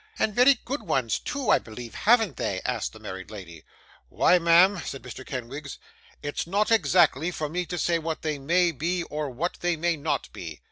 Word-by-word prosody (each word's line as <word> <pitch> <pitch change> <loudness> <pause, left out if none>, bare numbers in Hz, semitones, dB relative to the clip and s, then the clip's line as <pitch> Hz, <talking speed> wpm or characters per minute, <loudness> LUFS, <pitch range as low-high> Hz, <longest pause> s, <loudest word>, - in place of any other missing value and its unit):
'And 215 - +1
very 250 +2 +5
good 270 +5 -3
ones 115 -5 0
too, 280 -3 -2
I - - +5
believe, 115 +1 -9
haven't 220 - +3
they?' - - -2
asked - - -1
the - - -12
married 95 0 -8
lady. 85 -7 -10 0.5
'Why, 180 - +4
ma'am,' 175 +3 +5
said 135 - -6
Mr. 125 +1 -8
Kenwigs, 135 +3 -6 0.5
'it's 145 +3 -3
not 205 +5 +1
exactly 175 - +3
for 155 -4 -3
me 175 +3 -3
to 175 - -4
say 170 -1 +1
what 160 0 -4
they 155 -2 -2
may 170 +5 +2
be, 170 +4 -2
or 150 -3 -4
what 150 +8 -3
they 175 -1 +1
may 170 +1 0
not 150 +2 -2
be. 80 -4 -8
165 Hz, 195 wpm, -26 LUFS, 135-180 Hz, 0.5 s, very